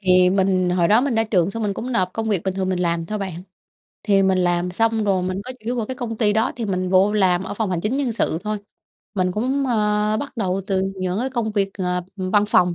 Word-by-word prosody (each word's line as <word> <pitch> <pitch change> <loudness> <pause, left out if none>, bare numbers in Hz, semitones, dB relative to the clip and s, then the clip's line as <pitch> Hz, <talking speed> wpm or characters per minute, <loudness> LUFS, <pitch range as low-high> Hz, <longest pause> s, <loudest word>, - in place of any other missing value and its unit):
Thì 185 -2 +4
mình 185 -2 +2
hồi 175 -1 +2
đó 215 +3 +5
mình 270 -1 0
ra 225 0 +2
trường 190 -4 +1
xong 225 +2 -4
mình 200 -2 -1
cũng 250 +2 -4
nộp 185 -5 +1
công 225 0 -3
việc 195 -5 +1
bình 190 -1 -2
thường 190 -1 -1
mình 185 -1 0
làm 170 -1 0
thôi 215 0 -3
bạn. 185 -3 -5 0.6
Thì 200 -2 +3
mình 190 -1 +2
làm 175 0 +1
xong 225 +3 +1
rồi 190 -3 +1
mình 185 +1 -2
có 255 - -6
chủ 255 - -19
yếu 245 +2 -2
vào 225 -3 -2
cái 260 - -4
công 240 -4 -5
ty 210 -2 +3
đó 220 +2 +1
thì 235 - -3
mình 185 -3 -1
vô 190 +2 +4
làm 185 -3 +2
ở 205 - -5
phòng 215 -2 -2
hành 175 -2 -1
chính 220 +7 -1
nhân 265 -5 0
sự 160 -7 -1
thôi. 210 0 -2 0.6
Mình 185 -2 0
cũng, 260 +7 0
ơ, 210 -2 +1
bắt 285 - -6
đầu 195 -3 -1
từ 190 -2 0 0.2
những 185 +2 -1
cái 260 +2 -1
công 230 -4 -2
việc, 200 -2 0
ờ, 180 -1 0 0.2
văn 200 +2 +1
phòng. 180 -4 +3
195 Hz, 270 wpm, -21 LUFS, 185-220 Hz, 0.6 s, đó